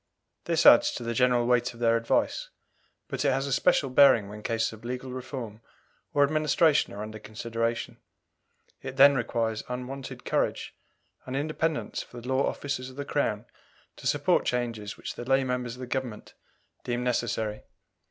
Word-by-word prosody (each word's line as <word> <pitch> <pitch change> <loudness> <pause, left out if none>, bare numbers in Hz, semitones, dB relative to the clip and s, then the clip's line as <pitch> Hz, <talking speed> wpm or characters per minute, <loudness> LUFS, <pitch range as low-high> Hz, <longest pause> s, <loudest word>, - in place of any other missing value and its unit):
This - - +1
adds - - +8
to - - -5
the 115 0 -2
general 125 0 +3
weight 125 0 +1
of - - -14
their 115 -1 +3
advice, 115 - 0 0.6
but - - -3
it 145 - +3
has 135 +1 0
a 140 - -1
special 145 -5 +2
bearing 125 -7 +6
when 105 +1 -9
cases 115 0 -1
of 110 +1 -13
legal 125 +2 -5
reform 125 -4 -6 0.5
or 145 - +4
administration 155 +1 +3
are 105 - -6
under 110 0 -8
consideration; 115 +2 -3 0.8
it 130 - -7
then 140 +1 +8
requires 115 -3 -1
unwonted 125 +1 -6
courage - - -1 0.5
and 130 - -4
independence 155 +2 -2
for 120 - -10
the 120 - -10
law 130 +1 +2
officers 135 -3 -3
of 130 - -13
the 140 0 -5
Crown 115 -7 -1 0.5
to - - -5
support - - +2
changes 115 -4 -3
which - - -6
the - - -7
lay 135 +2 +2
members 125 -2 -2
of - - -14
the - - -4
Government 125 -4 -5 0.5
deem 120 0 -2
necessary. 115 -3 -1
125 Hz, 170 wpm, -27 LUFS, 115-135 Hz, 0.8 s, adds